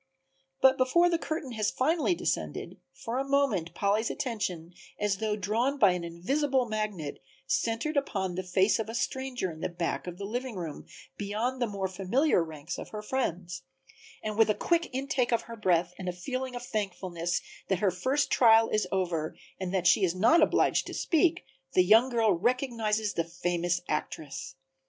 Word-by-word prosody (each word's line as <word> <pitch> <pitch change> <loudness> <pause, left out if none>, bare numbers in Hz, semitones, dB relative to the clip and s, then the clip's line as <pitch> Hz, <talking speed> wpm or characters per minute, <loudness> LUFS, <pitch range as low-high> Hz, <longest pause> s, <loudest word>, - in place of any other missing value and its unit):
But 265 0 +5
before 340 +8 +4
the 335 - +1
curtain 310 -6 -4
has 215 -3 0
finally 320 +6 +1
descended, - - -3
for 240 +2 -4
a - - +1
moment 275 -12 +1
Polly's 210 +3 +1
attention, 180 -8 -3 0.3
as 210 -2 +1
though 215 0 -1
drawn 225 +8 0
by 205 -8 +6
an 180 -1 -2
invisible 260 - 0
magnet, 210 -9 -3 0.2
centered 230 - 0
upon 195 -10 -1
the 185 - -2
face 185 +4 +2
of 220 -1 -3
a 225 - -5
stranger 250 -6 -2
in 155 - -11
the - - -1
back 170 0 -3
of 175 0 -6
the 200 - -5
living 245 +3 -4
room 165 -5 -6 0.3
beyond 220 +6 -2
the 240 - +2
more 200 -2 -2
familiar 195 - +2
ranks 160 +1 -6
of - - -7
her 210 -1 -6
friends; 180 -8 -2 0.6
and 215 0 -3
with 225 - +6
a 210 - +3
quick 340 -1 +1
intake 265 -1 0
of 235 - +2
her 230 - -8
breath 180 -5 +1
and 185 -1 -3
a - - -3
feeling 255 +7 -4
of 245 0 -6
thankfulness 180 -5 -2 0.3
that 190 - +1
her 195 +1 +2
first 260 +11 0
trial 225 -2 +6
is 215 -3 0
over 170 -5 -1 0.2
and 185 -1 -3
that 185 -2 0
she 190 +3 +5
is 180 -1 +2
not 230 - +5
obliged - - +3
to - - -6
speak, 335 +2 +2 0.3
the 185 - +5
young 225 +7 +6
girl 230 -3 +3
recognizes 220 0 0
the 165 - 0
famous 175 +1 -1
actress. 135 -3 -4
210 Hz, 180 wpm, -29 LUFS, 180-255 Hz, 0.6 s, by